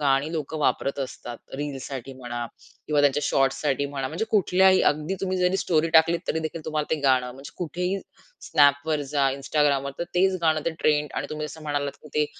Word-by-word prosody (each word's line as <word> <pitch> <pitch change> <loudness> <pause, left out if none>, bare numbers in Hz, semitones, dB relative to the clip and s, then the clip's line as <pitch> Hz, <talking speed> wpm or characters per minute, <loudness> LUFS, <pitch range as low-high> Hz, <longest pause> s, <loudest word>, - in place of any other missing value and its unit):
गाणी 140 +1 +2
लोक 155 -1 -4
वापरत 145 -2 0
असतात 120 -2 -6 0.2
रीलसाठी 135 -2 -5
म्हणा 120 -2 -5 0.4
किंवा 150 -1 +2
त्यांच्या 145 0 +3
शॉर्ट्ससाठी 135 +1 +1
म्हणा. 135 -2 -4
म्हणजे 170 +8 -2
कुठल्याही 190 -2 +4
अगदी 155 +5 -3
तुम्ही 185 -1 -1
जरी 180 +1 +2
स्टोरी 165 -3 +1
टाकलीत, 165 +1 +5
तरी 160 - +1
देखील 160 0 -5
तुम्हाला 155 -1 -2
ते 150 - -5
गाणं 130 -2 +3
म्हणजे 135 +1 -11
कुठेही 180 +3 -2 0.5
Snapवर 145 +2 +3
जा, 140 -2 +3
Instagramवर 140 -1 +1
तर 170 - -1
तेच 190 +1 +3
गाणं, 155 -1 +3
ते 165 - +1
ट्रेंड. 150 -1 +2
आणि 140 - -2
तुम्ही 150 0 -3
जसं 160 +1 -10
म्हणालात, 145 -2 -2
की 150 - -12
ते 150 0 +2
150 Hz, 185 wpm, -25 LUFS, 140-160 Hz, 0.5 s, टाकलीत